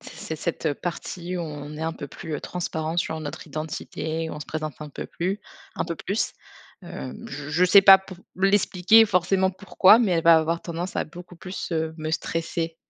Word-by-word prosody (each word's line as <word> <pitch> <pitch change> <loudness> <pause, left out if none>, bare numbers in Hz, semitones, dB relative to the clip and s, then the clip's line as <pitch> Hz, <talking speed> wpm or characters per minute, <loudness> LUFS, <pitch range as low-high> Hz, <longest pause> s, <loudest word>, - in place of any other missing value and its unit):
c'est 215 -9 -7
ce - - -13
cette 165 -3 -1
partie 175 +1 -4
où - - -2
on 150 -2 -7
est 155 - -5
un 160 0 -1
peu 145 - -7
plus, 160 +3 -7
heu, - - -7
transparents 165 -2 -3
sur 160 -2 -1
notre 150 +2 -7
identité, 160 +1 -4
où - - -6
on 150 - -8
se - - -7
présente 155 -2 -5
un 150 - -6
peu - - -6
plu 190 +4 -3 0.4
un - - 0
peu 170 -1 -4
plus. 205 +3 -2 0.5
Hem, 65 0 -8
j 140 +1 -7
je 170 +4 +3
sais 195 +2 +7
pas 195 -1 +10
pour 190 -1 -12 0.2
l'expliquer, 195 +2 +5
forcément 190 0 +2
pourquoi, 195 +2 +5
mais 215 -7 +2
elle 165 -1 +1
va 165 -1 +8
avoir 165 +1 -1
tendance 175 +2 -5
à - - 0
beaucoup 175 +2 -12
plus, 185 +2 -6
heu, 160 -1 -1
me 155 0 -3
stresser. 165 0 -2
165 Hz, 210 wpm, -25 LUFS, 155-185 Hz, 0.5 s, pas